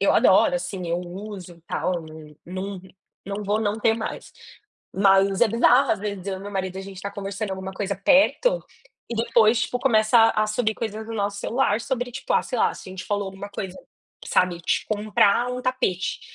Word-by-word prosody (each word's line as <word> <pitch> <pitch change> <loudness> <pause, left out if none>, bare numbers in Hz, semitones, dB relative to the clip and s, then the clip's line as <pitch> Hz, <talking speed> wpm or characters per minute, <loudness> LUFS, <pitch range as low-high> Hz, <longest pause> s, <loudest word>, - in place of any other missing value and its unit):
eu 200 - +3
adoro, 190 - +5
assim. 180 +1 -4
Eu 170 +1 0
uso 185 0 -8
e - - -22
tal. 180 -2 -2
Num, 155 -1 -12
num, 190 +1 -5 0.5
não 200 +1 -4
vou 210 +2 0
não 210 0 -1
ter 225 0 +3
mais. 225 -1 -6 0.6
Mas 195 0 +4
é 240 - +5
bizarro. 245 +4 +4
Às 215 - -2
vezes, 200 -3 -4
eu 195 -1 -2
e - - -11
meu 200 +1 -7
marido, 190 -1 -3
a - - -5
gente 190 -1 -9
tá 200 +1 -5
conversando 200 +1 -5
alguma 190 0 -6
coisa 200 0 -3
perto 300 - +3 0.5
e, - - -2
depois, 230 -1 +3
tipo, 235 +3 -2
começam 225 -2 +4
a 215 0 +2
surgir 215 0 0
coisas 220 -1 -5
no 225 - -6
nosso 200 -1 -1
celular 235 -3 +1
sobre, 245 -1 -3
tipo, 265 +1 -4
ah, - - +3
sei 250 - -4
lá, - - +3
se - - -11
a - - -8
gente 185 - -7
falou 205 -1 -1
alguma 195 +1 -7
coisa, 190 -2 -6 0.5
sabe? 180 -1 +1
De 170 - -1
comprar 215 +2 +2
um 250 - -4
tapete. 250 -9 -1
205 Hz, 205 wpm, -24 LUFS, 190-225 Hz, 0.6 s, adoro